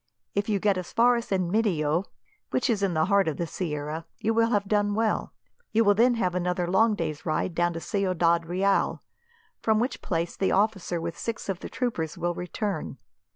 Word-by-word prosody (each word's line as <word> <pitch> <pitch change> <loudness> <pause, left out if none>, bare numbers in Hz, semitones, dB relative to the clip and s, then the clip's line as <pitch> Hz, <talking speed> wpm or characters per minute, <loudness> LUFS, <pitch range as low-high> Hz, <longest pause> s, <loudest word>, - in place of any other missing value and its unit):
If 200 +2 -1
you 205 - +2
get 195 -1 +1
as 180 - -7
far 240 +1 +4
as 235 0 -4
Enmedio, 180 -3 +1 0.4
which 255 0 +1
is 210 -3 0
in 190 -4 +1
the 155 0 +3
heart 200 -1 +3
of 155 - -1
the 170 - -1
sierra, 155 -1 -4
you 225 - 0
will 230 0 +3
have 205 -3 +1
done 205 0 +1
well. 220 -1 0 0.4
You 225 +1 +4
will 205 -1 +5
then 240 +4 +4
have 185 -6 0
another 180 0 0
long 210 +5 +3
day's 155 -5 -3
ride 165 +2 -1
down 175 +1 +1
to 165 - -4
Ciudad 170 -3 +1
Real, 195 +3 +1 0.6
from 220 -1 +2
which 245 +4 -2
place 170 -2 -2
the 190 - +1
officer 195 -4 +1
with 165 0 -4
six 230 -3 -4
of 190 -2 -2
the - - -7
troopers 205 -11 -2
will 175 0 -1
return. 180 - -4
190 Hz, 200 wpm, -27 LUFS, 170-215 Hz, 0.6 s, will